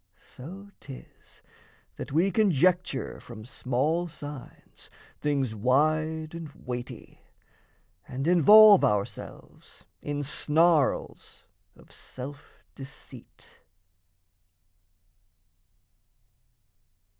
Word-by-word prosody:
So 190 +10 -12
'tis 135 -2 -14 0.5
that - - -8
we 170 +7 +2
conjecture 180 - +1
from 110 -3 -11
small 135 +7 -1
signs 145 -4 -11 0.3
Things 140 -5 -1
wide 155 +7 0
and 165 -3 -8
weighty, 125 -1 -8 0.9
and 135 +2 -5
involve 205 +5 +7
ourselves 105 -1 -4 0.2
In 145 0 -4
snarls 155 +1 0 0.3
of - - -20
self 140 +4 -11
deceit. 135 -1 -13
150 Hz, 70 wpm, -27 LUFS, 130-170 Hz, 0.9 s, involve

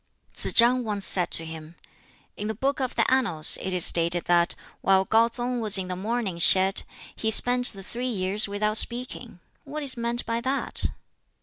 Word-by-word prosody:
Tsz - - -2
chang 245 +1 +2
once 205 -3 -1
said 180 -2 +5
to 165 - 0
him, 160 0 -11 0.6
"In 210 - -6
the 220 - -5
'Book 275 +6 -3
of 260 -1 -4
the - - 0
Annals' 205 -13 +2
it 190 - -5
is 180 -2 +3
stated 170 +1 +2
that 175 0 +1 0.3
while 190 0 +1
KŠu 230 +3 +1
tsung 245 0 -4
was 215 -2 +2
in 185 -1 -5
the 180 - -4
Mourning 205 -2 -5
Shed 190 +3 +4 0.3
he 220 - -3
spent 245 +2 +3
the 195 -2 -3
three 245 +6 -6
years 200 -1 -1
without 210 +2 -2
speaking. 240 -4 -1 0.2
What 300 +1 -8
is 270 -2 -2
meant 235 +1 -2
by 230 0 -4
that?" 265 +3 +1
215 Hz, 190 wpm, -23 LUFS, 185-245 Hz, 0.6 s, said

